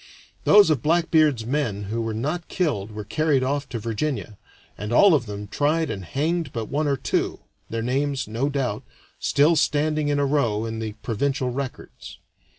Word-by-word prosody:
Those 205 -6 +7
of 140 -6 +1
Blackbeard's 155 -6 +3
men 120 -6 -1
who 110 +4 -3
were 115 -1 -3
not 155 +9 -3
killed 115 - -1
were 105 0 -6
carried 145 +5 +1
off 140 +1 -1
to 120 - -4
Virginia, 115 -1 -3 0.4
and 105 +2 -6
all 190 +10 +6
of 130 -7 +1
them 105 0 -6
tried 150 +7 0
and 100 -3 -5
hanged 160 - -1
but 115 -2 -4
one 150 +2 0
or 140 -1 +1
two, - - -1 0.3
their 115 0 -3
names, 135 +2 -1
no 115 +6 -1
doubt, 130 -7 -2 0.4
still 150 +4 +3
standing 150 0 +1
in 145 0 +1
a 145 - +2
row 115 -7 +1
in 110 0 -4
the 110 -1 -4
provincial 130 +2 -1
records. 130 +1 -7
135 Hz, 175 wpm, -24 LUFS, 110-150 Hz, 0.4 s, Those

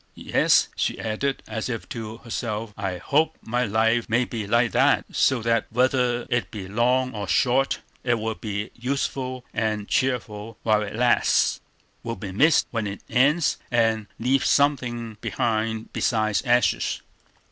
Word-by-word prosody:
Yes," - - +3
she - - -1
added, 135 +6 -2
as 110 +2 -4
if 115 -2 -4
to 110 -1 -6
herself, 110 -2 -4
"I 95 -3 -3
hope 145 - +1
my 120 +2 -1
life 115 +2 +1
may 120 +3 +2
be 110 -4 -5
like 120 +2 +2
that, - - +3
so 125 -4 +2
that, 115 0 +1
whether 125 0 +1
it 120 -2 -1
be 100 -4 -7
long 125 +5 +1
or 105 -2 -4
short, 135 +2 +2 0.2
it 120 -2 +2
will 110 0 -2
be 105 0 -5
useful 130 0 -3
and 110 -3 -1
cheerful 115 -5 -1
while 110 -1 +3
it 105 0 -5
lasts, 120 +1 +2 0.4
will 115 0 -4
be 100 -4 -7
missed 145 - +4
when 115 -3 -2
it 100 0 -6
ends, 145 +6 +3
and 110 -3 +1
leave 130 +3 +1
something 120 -6 +1
behind 110 +1 -2
besides 110 -5 +1
ashes." 120 -2 +2
115 Hz, 150 wpm, -24 LUFS, 110-125 Hz, 0.4 s, missed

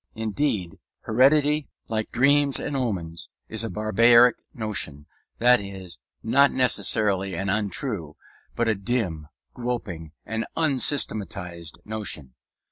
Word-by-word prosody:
Indeed, 110 - -2 0.2
heredity, 145 +5 +2 0.2
like 110 -1 -3
dreams 140 +2 +3
and 145 - -4
omens, 90 -11 -3 0.2
is 110 0 -1
a 115 - -3
barbaric 115 +3 +4 0.2
notion; 100 - -2 0.3
that 125 +1 +5
is, 95 -3 -9 0.2
not 140 +5 +4
necessarily 100 -7 +3
an 95 +3 -3
untrue, 100 - -2 0.4
but 120 - 0
a 110 - +3
dim, 95 -7 -3 0.3
groping 100 -11 -5
and 115 0 -4
unsystematized 100 - -1
notion. 105 -12 -2
110 Hz, 110 wpm, -24 LUFS, 95-125 Hz, 0.4 s, that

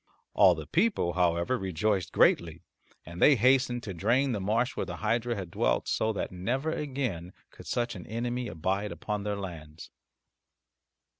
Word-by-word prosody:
All 95 -3 +6
the 80 -2 -7
people, 165 - +1
however, 90 +6 +1
rejoiced 95 0 -1
greatly, - - +2 0.4
and 85 +2 -9
they 145 - +7
hastened 125 0 +2
to 100 - -5
drain 120 +10 +1
the 105 -4 -2
marsh 115 +6 0
where - - -3
the - - -5
hydra 115 +2 -1
had 95 -5 -6
dwelt - - 0
so 110 - +1
that - - -3
never 125 - -2
again 130 - -3 0.2
could - - -14
such 120 0 -1
an 90 -4 -9
enemy 120 +3 -3
abide 95 +4 -2
upon 105 -1 -4
their 105 0 -2
lands. 80 -5 -8
105 Hz, 160 wpm, -29 LUFS, 90-120 Hz, 0.4 s, they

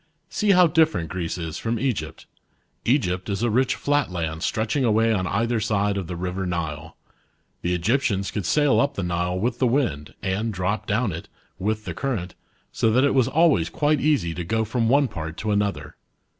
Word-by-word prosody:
See 210 - 0
how 180 -1 +7
different 160 - +2
Greece 90 -3 -3
is 85 -1 -5
from 115 +1 -1
Egypt. 100 - -3 0.6
Egypt 95 -8 +1
is 100 +2 -1
a 120 - +2
rich 125 +3 +2
flat 145 -4 0
land 80 -3 -3
stretching 110 +9 0
away 115 -1 +3
on 95 -3 -1
either 115 +4 0
side 105 -1 0
of 95 -4 -3
the 90 - -5
river 90 +2 -3
Nile. 80 -2 -4 0.6
The 90 +1 0
Egyptians 100 0 0
could 100 -5 -3
sail 145 -2 +3
up 140 0 +1
the 95 - -2
Nile 90 +1 -1
with 115 +5 -1
the 130 - +3
wind, 115 - -1
and* 100 +4 -1
drop 95 +2 -2
down 110 +1 +1
it, 85 0 -7 0.3
with 110 +3 -2
the - - -4
current, 105 -10 -3 0.4
so 115 - +1
th^t 125 +4 +3
it 140 - +3
was 130 -3 +3
always 145 - +3
quite 150 - +1
easy 140 - +1
to 90 - -4
*go 110 +6 0
from 115 +1 0
one 140 +2 +4
part 80 -6 -6
to 110 - -2
another. 100 -1 -1
105 Hz, 195 wpm, -24 LUFS, 90-125 Hz, 0.6 s, how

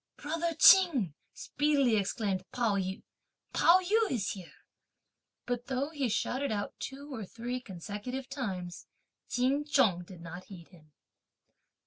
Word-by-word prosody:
"Brother 330 +2 -2
Ching," 315 - +6 0.2
speedily 285 -5 +1
exclaimed 200 -2 -1
Pao 235 -5 +1
yü, 190 -1 -3 0.5
"Pao 345 +2 +6
yü 430 +4 +2
is 215 -5 -1
here!" 185 -4 -9 0.9
But 245 0 -3
though 270 +3 -2
he 280 -6 -1
shouted 260 +5 -1
out 205 -1 -2
two 280 +1 -7
or 225 -4 -5
three 240 +5 -5
consecutive 210 +6 -6
times, 190 -11 -5 0.4
Ch'in 265 +4 +1
Chung 225 - +2
did 175 -1 -12
not 175 +2 -8
heed 175 -4 -12
him. 155 -4 -20
245 Hz, 130 wpm, -31 LUFS, 190-280 Hz, 0.9 s, Ching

